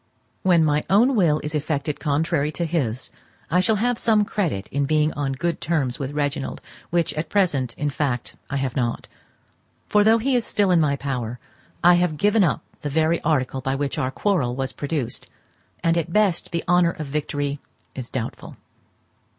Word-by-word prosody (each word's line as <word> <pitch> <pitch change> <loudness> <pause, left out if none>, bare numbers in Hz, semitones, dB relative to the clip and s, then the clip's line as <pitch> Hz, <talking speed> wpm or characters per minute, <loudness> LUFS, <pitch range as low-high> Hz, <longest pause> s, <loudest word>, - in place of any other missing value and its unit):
When 175 -4 +4
my 150 0 +2
own 235 +7 +4
will 165 -7 +3
is 150 - -4
effected 150 -1 -2
contrary 150 0 0
to 170 - -1
his, 130 -8 -2 0.4
I 180 - +4
shall 220 +4 +3
have 240 +3 0
some 215 -2 +3
credit 165 - -2
in 140 0 0
being 155 0 +2
on 140 -2 -2
good 170 +6 -2
terms 155 -7 -1
with 135 -2 -3
Reginald, 145 -1 -2 0.3
which 170 -1 +1
at 155 +1 -4
present, 145 - +1
in 145 0 -1
fact, 130 -4 -2
I 140 - -1
have 135 -2 -2
not; 120 -3 -1 0.8
for 210 0 +4
though 220 +2 +5
he 255 +3 +1
is 240 - +2
still 205 -4 +1
in 175 - +5
my 145 -2 +2
power, 125 -4 -3 0.5
I 175 +1 +8
have 165 -4 0
given 205 +4 +3
up 155 -7 0 0.2
the 145 - -3
very 160 +3 +1
article 135 -4 0
by 135 +1 -1
which 140 -1 -2
our 130 - 0
quarrel 135 -5 0
was 135 0 -3
produced, 145 -4 -4 0.5
and 165 0 +3
at 170 -1 -1
best 200 -3 +2
the 170 -1 -2
honour 175 -1 +4
of 155 - -6
victory 145 0 -2 0.3
is 125 -2 -7
doubtful. 120 -3 -5
150 Hz, 185 wpm, -23 LUFS, 140-175 Hz, 0.8 s, I